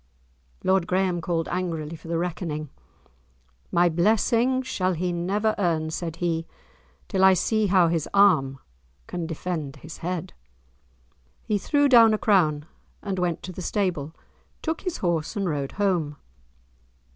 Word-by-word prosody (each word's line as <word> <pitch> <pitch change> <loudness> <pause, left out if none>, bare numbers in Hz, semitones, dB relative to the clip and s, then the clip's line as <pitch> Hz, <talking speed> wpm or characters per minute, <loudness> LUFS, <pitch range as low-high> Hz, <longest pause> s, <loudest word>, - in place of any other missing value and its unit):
Lord 190 -2 +2
Graeme 185 -2 +1
called 165 -1 -1
angrily 165 -3 -3
for 165 - -13
the 165 0 -1
reckoning. 165 -3 -3 1.0
"My 175 +1 +4
blessing 225 +9 +2
shall 185 -7 -1
he 175 +1 -2
never 200 +5 0
earn," 160 -4 0
said 165 0 -4
he, 165 -2 -2 0.6
"till 190 -3 0
I 190 0 +7
see 215 +3 +1
how 185 -2 +4
his 165 -2 -1
arm 160 -10 +4 0.5
can 170 -2 -4
defend 160 -3 -4
his 160 +1 -10
head." 180 +1 -4 1.1
He 210 -1 0
threw 290 +6 +2
down 230 -4 +7
a - - -2
crown, 155 -9 +2 0.4
and 195 -2 -3
went 175 -2 -1
to 185 - -6
the 185 - -8
stable, 170 -6 -2 0.5
took 320 0 -2
his 365 -3 -3
horse, 170 0 -1
and 200 -2 -1
rode 145 -4 -2
home. 175 -8 0
180 Hz, 145 wpm, -25 LUFS, 165-200 Hz, 1.1 s, I